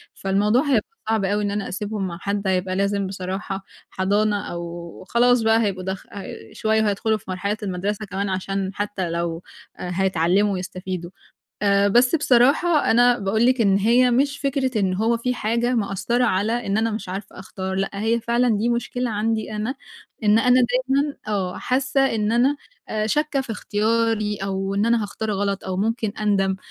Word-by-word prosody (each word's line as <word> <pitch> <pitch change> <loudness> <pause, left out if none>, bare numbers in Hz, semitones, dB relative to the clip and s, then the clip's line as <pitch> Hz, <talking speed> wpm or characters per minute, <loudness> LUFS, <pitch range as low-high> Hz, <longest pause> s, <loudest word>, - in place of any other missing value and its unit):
فالموضوع 205 +5 +2
هيبقى 270 -8 +1 0.2
صعب 220 -3 +1
أوي 205 +2 0
إن 205 - -1
أنا 205 -1 -3
أسيبهم 205 0 -3
مع 170 -1 -6
حد، 200 0 -2
هيبقى 185 0 0
لازم 200 0 0
بصراحة 190 +1 -5 0.3
حضَانة 205 +2 +1
أو 170 0 -7
خلاص 245 +1 +4
بقى 225 +1 +4
هيبقوا 190 -3 -2
دخ 190 0 -4
هي 200 - -7 0.2
شوية 220 0 +1
وهيدخُلوا 215 +1 +1
في 210 - -19
مرحلة 200 +3 -2
المدرسة 200 +2 -2
كمان 200 0 -3
عشان 190 +1 -2
حتى 205 -4 -3
لو 170 0 -3 0.3
آآ، 180 - -5
هيتعلّموا 190 +2 +2
ويستفيدوا. 185 -1 -5 0.5
آآ، 200 0 +4
بس 245 +7 +4
بصراحة 290 +4 +3
أنا 245 +1 +5
باقول 215 +4 +1
لِك 255 -1 +3
إن 195 -2 +4
هي 240 +5 +4
مش 280 +4 +1
فكرة 270 -4 0
إن 190 -2 +1
هو 225 +4 +1
في 250 +2 -1
حاجة 235 +2 0
مأثّرة 230 +3 0
على 225 +3 0
إن 200 +2 +1
أنا 225 +1 +1
مش 215 -3 -5
عارفة 195 +2 -7
أختار، 190 0 -5
لأ 195 0 -1
هي 225 +4 0
فعلًا 235 +2 +1
دي 225 +3 0
مشكلة 240 +1 -1
عندي 220 +1 -1
أنا 220 +5 -2 0.5
إن 210 +1 +5
أنا 250 +2 +5
دايمًا 270 +3 +1
آه، 190 -4 -2
حاسّة 265 +1 0
إن 215 0 0
أنا 255 +5 +3 0.3
آآ، 215 0 -1
شاكة 295 +4 +1
في 255 -4 -4
اختياري 215 0 0
أو 195 0 -3
إن 205 +2 +1
أنا 235 -1 +3
هاختار 215 +2 -4
غلط 200 0 -1
أو 185 -1 -3
ممكن 220 +1 -1
أندَم، 195 -2 +1
210 Hz, 175 wpm, -22 LUFS, 195-235 Hz, 0.5 s, أنا